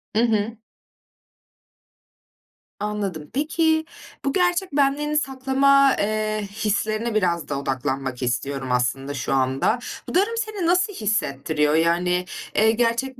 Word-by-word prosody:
Hı - - +3
hı. 220 -1 0 2.2
Anladım. 200 -8 -3
Peki, 315 +2 +1 0.4
bu 275 - +1
gerçek 355 -1 +1
benliğini 295 +2 +1
saklama, 275 0 +3
eee, 215 0 -1
hislerine 215 +1 -1
biraz 170 -7 0
da 140 -1 -1
odaklanmak 135 -1 -3
istiyorum 130 +2 -2
aslında 135 +3 0
şu 130 -1 -2
anda. 135 - +1 0.3
Bu - - -5
durum 435 +5 +2
seni 430 -5 -2
nasıl 365 +3 +2
hissettiriyor? 155 - 0
Yani, 175 +2 +2 0.3
eee, 220 +1 +5
gerçek 240 +3 0
215 Hz, 115 wpm, -23 LUFS, -, 2.2 s, eee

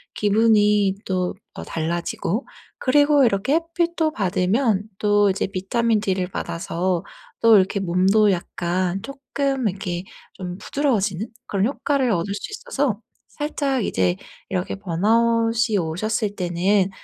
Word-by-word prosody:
기분이 210 -2 +3
또 185 -1 -1 0.2
어 - - -6
달라지고 170 - -2 0.3
그리고 290 +1 +4
이렇게 225 +6 +1
햇빛도 335 -1 0
받으면 200 +3 +1
또 205 -1 +3
이제 190 - 0
비타민 210 +4 0
D를 185 -3 -1
받아서 170 0 -2 0.4
또 225 -2 +7
이렇게 195 +1 +1
몸도 195 +4 +3
약간 180 +1 -2
쪼끔 275 -1 -2
이렇게 185 -2 -3 0.3
좀 180 -1 -6
부드러워지는 215 -8 -1 0.2
그런 195 0 +1
효과 280 +3 -1
얻을 205 -8 +1
수 205 - -6
있어서 285 - -2 0.3
살짝 280 -5 -2
이제 90 - +1 0.3
이렇게 95 +1 -2
번아웃이 225 - +2
오셨을 205 +5 -1
때는 185 +2 +1
205 Hz, 275 characters per minute, -22 LUFS, 185-235 Hz, 0.4 s, 또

